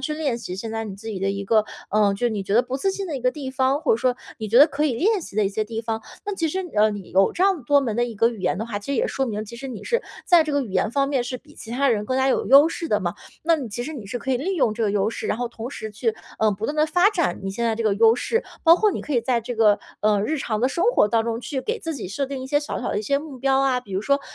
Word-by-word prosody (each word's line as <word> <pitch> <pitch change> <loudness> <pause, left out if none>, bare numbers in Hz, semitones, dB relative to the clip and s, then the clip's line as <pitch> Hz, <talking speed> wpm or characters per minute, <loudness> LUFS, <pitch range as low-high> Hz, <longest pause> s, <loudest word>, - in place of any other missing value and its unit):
去 300 +3 -2
练 285 -6 -1
习 185 -6 -6
现 220 +4 -5
在 225 0 -3
你 200 - -6
自 225 +3 -9
己 210 -3 -4
的 195 +1 0
一 200 0 -4
个 215 +1 +3 0.3
嗯， 205 -1 +3
就 240 +5 0
你 210 -3 -3
觉 195 +1 -2
得 240 - +5
不 255 +1 -4
自 390 +8 0
信 390 0 -4
的 310 -5 -3
一 - - -5
个 250 +1 +2
地 275 -2 -6
方， 265 +2 +1
或 - - +2
者 - - +3
说 250 +1 +1 0.2
你 220 -2 -4
觉 230 - +5
得 290 - +9
可 300 -1 -1
以 275 - +1
练 405 - +2
习 310 - -10
的 215 - +3
一 195 - +2
些 215 +2 -2
地 225 +1 -4
方。 225 -1 -3 0.2
那 410 -1 -3
其 330 -3 -1
实， 375 +4 -2
呃， 215 +1 +5
你 205 -3 -7
有 195 +1 +3
这 360 - -1
样 380 -8 +2
多 285 +3 +4
门 230 -6 -2
的 240 - +2
一 235 -2 -6
个 225 +3 +3
语 230 -4 -7
言 185 - 0
的 220 - -2
话， 215 -3 -3
其 205 - -13
实 - - 0
也 - - +1
说 270 - -1
明 215 -2 -3
其 235 +2 -10
实 270 +3 -7
你 225 -6 -7
是 475 - 0 0.2
在 345 -2 +6
这 305 - -3
个 285 -1 +1
语 225 - -7
言 195 +3 +1
方 275 +2 +1
面 270 -4 +1
是 255 +1 -4
比 295 +4 -20
其 225 - -11
他 275 +4 +1
人 215 -4 +1
更 255 +4 -1
加 265 0 +2
有 - - +1
优 280 +4 +7
势 330 0 -5
的 210 - +1
嘛， 175 -1 -2 0.3
那 330 +1 +3
你 270 -6 -5
其 230 +3 -4
实 310 - -5
你 240 -9 -8
是 225 +5 -4
可 265 - -4
以 255 - +3
利 365 +10 -2
用 230 -10 +1
这 230 - -3
个 210 - +2
优 200 0 +1
势， - - -5
然 - - 0
后 245 -1 -2
同 235 +1 -7
时 220 -5 -6
去， 225 +2 -1 0.2
呃， 220 -1 +3
不 205 +3 -4
断 295 - -2
地 305 - +4
发 355 +5 +4
展 345 -6 -1
你 195 - -3
现 235 +5 -3
在 225 -1 +1
这 230 - -3
个 215 -2 +2
优 225 +2 +5
势。 455 - -1 0.2
包 330 0 +9
括 425 +3 +3
你 - - -4
可 300 - -5
以 240 - +3
在 240 -1 0
这 240 +2 -5
个， 215 -2 +4 0.2
嗯， 210 -1 +2
日 315 - -1
常 220 -5 -2
的 255 - +3
生 340 +5 -1
活 210 - +4
当 225 +1 +1
中 230 0 -2
去 265 +1 -4
给 455 - -2
自 330 -5 -4
己 225 -9 -6
设 275 +9 -2
定 270 -1 -5
一 - - -6
些 290 +2 +2
小 295 - -4
小 - - -3
的 - - -1
一 - - -3
些 280 +6 +1
目 290 -3 -9
标 270 +1 +2
啊， 265 -2 +2
比 205 -5 -13
如 190 - 0
说 280 +5 +2
240 Hz, 370 characters per minute, -23 LUFS, 215-285 Hz, 0.3 s, 得